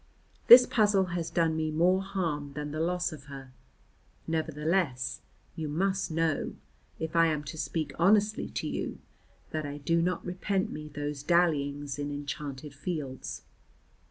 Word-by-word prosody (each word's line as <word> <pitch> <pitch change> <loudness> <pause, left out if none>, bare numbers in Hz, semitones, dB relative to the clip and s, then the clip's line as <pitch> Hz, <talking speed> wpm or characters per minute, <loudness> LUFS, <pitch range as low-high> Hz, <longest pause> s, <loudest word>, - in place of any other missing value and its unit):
This 245 +1 +11
puzzle 205 -5 +3
has 170 -2 -2
done 165 -1 +1
me 160 0 0
more 175 +5 +3
harm 165 -8 -3
than 150 0 -4
the 155 - -4
loss 180 +2 0
of 150 -3 -10
her. 135 -2 -10 0.7
Nevertheless, 160 -3 -1 0.3
you 160 -3 -4
must 190 +5 0
know 160 -2 0 0.4
(if 160 +1 -4
I 165 0 +6
am 155 -2 -1
to 140 - -7
speak 160 0 -3
honestly 210 +4 +3
to - - -3
you) - - -3 0.5
that 155 0 -2
I 145 0 -5
do 165 +4 +1
not 180 +1 -1
repent 190 +2 -1
me 150 0 -6
those 145 -1 -4
dallyings 145 -4 +1
in 145 0 -2
enchanted 145 0 -5
fields. 145 -4 -5
160 Hz, 150 wpm, -29 LUFS, 145-180 Hz, 0.7 s, This